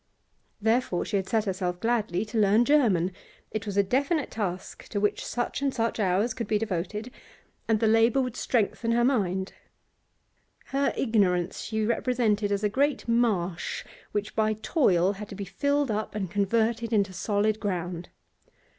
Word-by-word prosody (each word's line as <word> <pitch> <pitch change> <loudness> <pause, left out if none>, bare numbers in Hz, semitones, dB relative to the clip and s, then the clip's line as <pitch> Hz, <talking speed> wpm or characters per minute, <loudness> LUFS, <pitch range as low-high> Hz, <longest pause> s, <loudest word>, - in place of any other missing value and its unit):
Therefore 220 -4 +1
she 205 - 0
had 190 -1 -3
set 220 -2 +1
herself 185 -2 -2
gladly 220 -4 0
to 220 +1 -2
learn 210 +3 +4
German; 215 - +3 0.4
it 215 -1 -4
was 200 -1 -3
a 200 - +5
definite 280 - 0
task 190 -5 -4
to 205 - -2
which 205 0 0
such 240 +3 -3
and 280 -1 +1
such 230 -2 -1
hours 200 +4 +1
could 230 -1 -4
be 215 - +2
devoted, 210 +3 -3 0.6
and 225 -2 +2
the 225 - +1
labour 225 +3 +4
would 250 -3 -1
strengthen 230 -1 0
her 240 0 +3
mini 190 -8 +1 1.2
Her 275 +1 0
ignorance 190 -7 +1
she 220 -1 -2
represented 225 -3 +1
as 200 +1 0
a - - +4
great 275 +7 0
marsh 205 -8 0 0.3
which 210 0 -3
by 215 0 +2
toil 200 - +2
had 205 +1 -8
to - - -7
be 200 0 -5
filled 285 +7 0
up 215 0 -3
and 190 -5 -3
converted 225 +3 +1
into 200 -4 +1
solid 210 +3 0
ground. 175 -4 -3
215 Hz, 165 wpm, -27 LUFS, 195-235 Hz, 1.2 s, a